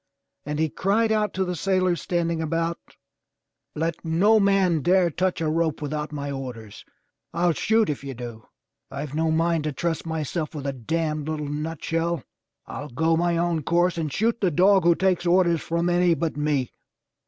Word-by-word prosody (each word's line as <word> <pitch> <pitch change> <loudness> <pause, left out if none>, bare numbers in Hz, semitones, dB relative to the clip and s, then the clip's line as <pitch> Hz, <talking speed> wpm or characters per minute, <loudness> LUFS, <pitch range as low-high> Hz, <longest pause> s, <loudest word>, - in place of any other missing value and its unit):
And 150 0 -2
he 160 +1 +2
cried 215 +8 +1
out 215 -1 +1
to 190 0 0
the 180 0 -3
sailors 185 -1 +1
standing 170 -2 -1
about: 165 +1 -1 1.0
"Let 165 +1 -2
no 190 +7 +4
man 195 -5 +3
dare 180 +2 +3
touch 185 +2 -1
a 160 - 0
rope 160 0 0
without 150 0 -4
my 145 -1 -4
orders. 125 -6 -7 0.5
TU 170 0 +2
shoot 220 +5 +2
if 145 -2 -3
you 135 -2 -6
do. 115 -2 -8 0.4
I've 140 +1 -6
no 160 +1 +1
mind 165 0 +1
to 150 - 0
trust 165 +3 -3
myself 160 0 -3
with 145 -2 -5
a 140 - -1
damned 155 +4 -2
little 155 -1 -3
nutshell! 165 +1 -2 0.4
I'll 145 +5 -7
go 160 +6 +1
my 170 0 +1
own 170 -1 0
course 175 +4 +2
and 160 -3 -3
shoot 230 +8 0
the 190 - +3
dog 185 +3 +4
who 170 -1 +5
takes 185 -1 +1
orders 170 -2 +3
from 170 +1 -1
any 175 -1 +3
but 160 +1 -2
me." 150 -4 0
165 Hz, 175 wpm, -24 LUFS, 150-175 Hz, 1.0 s, who